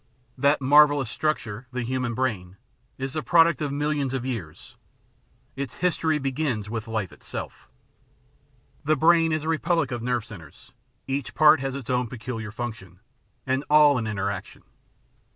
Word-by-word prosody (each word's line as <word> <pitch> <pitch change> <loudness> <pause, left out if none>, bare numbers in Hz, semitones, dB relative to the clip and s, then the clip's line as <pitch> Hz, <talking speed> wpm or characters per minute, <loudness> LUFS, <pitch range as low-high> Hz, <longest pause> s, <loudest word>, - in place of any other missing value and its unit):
"'That 140 +1 +2
marvellous 145 -2 +5
structure, 125 -7 -2
the 125 -1 -3
human 125 -1 -2
brain, 100 -8 -2 0.4
is 135 0 -4
the 155 - -2
product 170 +1 +4
of 145 -2 -1
millions 145 -2 -1
of 130 -1 -3
years; 110 -12 -6 0.8
its 140 0 -5
history 165 -3 +1
begins 135 -6 -2
with 110 0 -5
life 110 -5 -3
itself.*' - - -8 1.1
The 155 +1 +2
brain 165 +2 +4
is 155 -1 -1
a - - -5
republic 165 -2 0
of 120 -1 -3
nerve 120 -2 -1
centres; 100 -9 -13 0.3
each 135 0 -4
part 155 0 +6
has 135 0 -3
its 135 -3 -5
own 125 -1 +1
peculiar 115 -2 -6
function 110 -7 -7 0.2
— 100 - -43
and 130 +1 0
all 150 -3 +6
in 110 - -3
inter 100 -2 -1
action. 100 -2 -8
130 Hz, 155 wpm, -25 LUFS, 115-150 Hz, 1.1 s, part